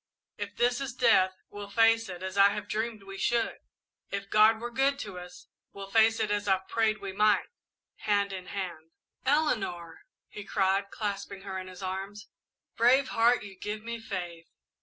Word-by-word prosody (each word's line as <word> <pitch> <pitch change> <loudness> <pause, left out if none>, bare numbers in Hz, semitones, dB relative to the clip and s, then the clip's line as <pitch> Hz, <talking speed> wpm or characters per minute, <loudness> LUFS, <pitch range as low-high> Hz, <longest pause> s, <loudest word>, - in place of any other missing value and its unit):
If 205 0 -6
this 245 +2 +1
is 260 -3 -4
death, 190 -7 +4 0.2
we'll 205 0 -8
face 225 +1 +3
it 180 0 -7
as 190 0 -5
I 200 0 +7
have 210 -1 -5
dreamed 220 0 -3
we 195 0 -9
should, 235 -1 0 0.5
if 200 0 -5
God 215 +1 +6
were 240 +1 -5
good 270 +3 +2
to 195 -4 -7
us; 180 0 -12 0.3
we'll 195 0 -9
face 225 +1 +4
it 210 - 0
as 205 0 -1
I've 190 -1 +1
prayed 220 -1 +1
we 195 - -5
might 210 +1 +3 0.5
hand 200 -1 0
in 185 -1 -7
hand!" 175 -5 -6 0.3
"Eleanor!" 195 - 0 0.2
he 210 - -9
cried, 195 0 +1
clasping 200 -2 -5
her 190 -1 -4
in 185 - -8
his 185 0 -10
arms. 195 +3 -5 0.5
"Brave 255 +4 +4
heart, 235 +1 +3
you 200 -1 -9
give 210 +3 -5
me 235 0 -5
faith! 175 -6 -6
205 Hz, 180 wpm, -29 LUFS, 190-225 Hz, 0.5 s, I